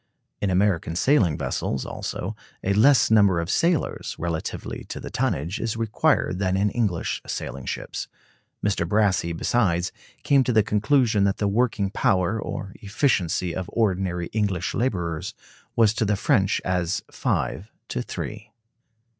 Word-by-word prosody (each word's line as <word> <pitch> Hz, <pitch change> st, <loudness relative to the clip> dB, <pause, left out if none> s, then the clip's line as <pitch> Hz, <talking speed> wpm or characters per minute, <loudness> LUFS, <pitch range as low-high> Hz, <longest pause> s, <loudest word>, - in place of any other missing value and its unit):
In 100 Hz, -, +1 dB
American 90 Hz, -3 st, +1 dB
sailing 95 Hz, -, +3 dB
vessels, 65 Hz, -, -2 dB
also, -, -, -4 dB, 0.3 s
a 100 Hz, -, +1 dB
less 120 Hz, +4 st, +5 dB
number 100 Hz, -5 st, +5 dB
of 85 Hz, +2 st, -2 dB
sailors, 170 Hz, -3 st, 0 dB
relatively 85 Hz, -2 st, -4 dB
to -, -, -6 dB
the -, -, -8 dB
tonnage, 80 Hz, +9 st, -1 dB
is 115 Hz, -1 st, -2 dB
required 110 Hz, -4 st, +1 dB
than 95 Hz, -1 st, +1 dB
in 100 Hz, +1 st, +2 dB
English 105 Hz, -8 st, -1 dB
sailing 70 Hz, -, -5 dB
ships. -, -, -4 dB, 0.6 s
Mr. 95 Hz, -5 st, 0 dB
Brassey, 100 Hz, -5 st, +2 dB
besides, 90 Hz, 0 st, +1 dB, 0.3 s
came 140 Hz, -2 st, +4 dB
to 125 Hz, -, 0 dB
the 110 Hz, -1 st, +5 dB
conclusion 110 Hz, 0 st, +2 dB
that 100 Hz, -, +1 dB
the 105 Hz, -, 0 dB
working 105 Hz, -2 st, +1 dB
power, 95 Hz, +3 st, +1 dB
or 95 Hz, -, -5 dB
efficiency, 95 Hz, -, 0 dB
of 95 Hz, -1 st, -4 dB
ordinary 95 Hz, -5 st, 0 dB
English 100 Hz, -5 st, 0 dB
laborers 90 Hz, -9 st, -2 dB, 0.4 s
was 110 Hz, -2 st, +4 dB
to 110 Hz, -, 0 dB
the 105 Hz, -1 st, +2 dB
French 100 Hz, -4 st, +2 dB
as 90 Hz, 0 st, 0 dB
five 105 Hz, +4 st, -2 dB, 0.2 s
to 60 Hz, -, -2 dB
three. 105 Hz, -, -6 dB
100 Hz, 145 wpm, -24 LUFS, 90-110 Hz, 0.6 s, less